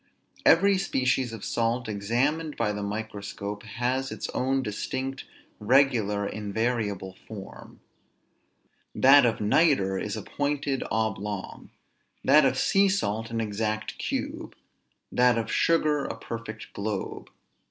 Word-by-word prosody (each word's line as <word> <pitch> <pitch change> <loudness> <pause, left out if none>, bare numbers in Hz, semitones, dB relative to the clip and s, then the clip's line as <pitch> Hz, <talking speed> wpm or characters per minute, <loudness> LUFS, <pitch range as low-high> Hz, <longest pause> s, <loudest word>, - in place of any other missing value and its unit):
Every 195 +3 +6
species 130 -8 0
of 115 -3 -7
salt, 115 +1 0
examined 125 +10 -1
by 110 -2 +1
the 105 0 -4
microscope, 100 -1 -5
has 125 +4 -2
its - - -5
own 135 +1 0
distinct, 130 +5 -4 0.3
regular, 110 -4 +3
invariable 105 -2 -2
form. 100 -3 -10 1.1
That 135 -1 +7
of 115 - -1
nitre 105 - +3
is 105 -2 -3
a - - -5
pointed 145 -2 -1
oblong; 105 -3 -3 0.5
that - - +6
of - - +2
sea 195 0 +3
salt 115 - -1
an 115 -1 -2
exact 110 0 -2
cube; - - -4 0.6
that 125 -1 +4
of 115 - -2
sugar 155 -3 +2
a - - -5
perfect 110 -1 -7
globe. 100 -1 -4
115 Hz, 120 wpm, -27 LUFS, 105-135 Hz, 1.1 s, That